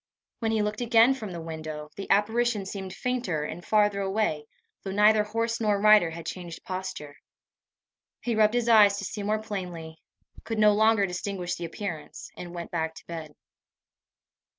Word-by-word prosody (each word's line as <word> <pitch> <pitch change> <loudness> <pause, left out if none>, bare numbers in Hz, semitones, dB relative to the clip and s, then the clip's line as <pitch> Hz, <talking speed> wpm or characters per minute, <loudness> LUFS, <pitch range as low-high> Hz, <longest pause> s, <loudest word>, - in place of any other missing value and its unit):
When 225 -2 0
he 220 -1 +1
looked 210 +2 -3
again 235 +1 +5
from 220 -7 -7
the 170 - -6
window, 155 -2 -7
the 200 - -7
apparition 220 +1 +2
seemed 190 -1 -6
fainter, 220 -8 -2
and 170 +3 -6
farther 205 -1 +2
away, 190 -7 -1 0.3
though 195 - -6
neither 210 +2 +4
horse 230 +2 -2
nor 210 -2 +2
rider 210 -4 +6
had 165 0 -8
changed 175 -2 -7
posture. 185 -6 -6 1.0
He 240 - -1
rubbed 215 +1 +3
his 240 -1 +1
eyes 210 -3 +6
to 200 - -4
see 210 - -5
more 210 +2 0
plainly, 175 -6 -6 0.4
could 225 - -4
no 210 -1 +6
longer 220 -1 +4
distinguish 180 -1 -4
the 170 - -4
appearance, 165 -3 -7
and 175 -1 -8
went 170 -1 -6
back 160 -1 -2
to - - -13
bed. 160 -3 -8
200 Hz, 170 wpm, -27 LUFS, 170-215 Hz, 1.0 s, rider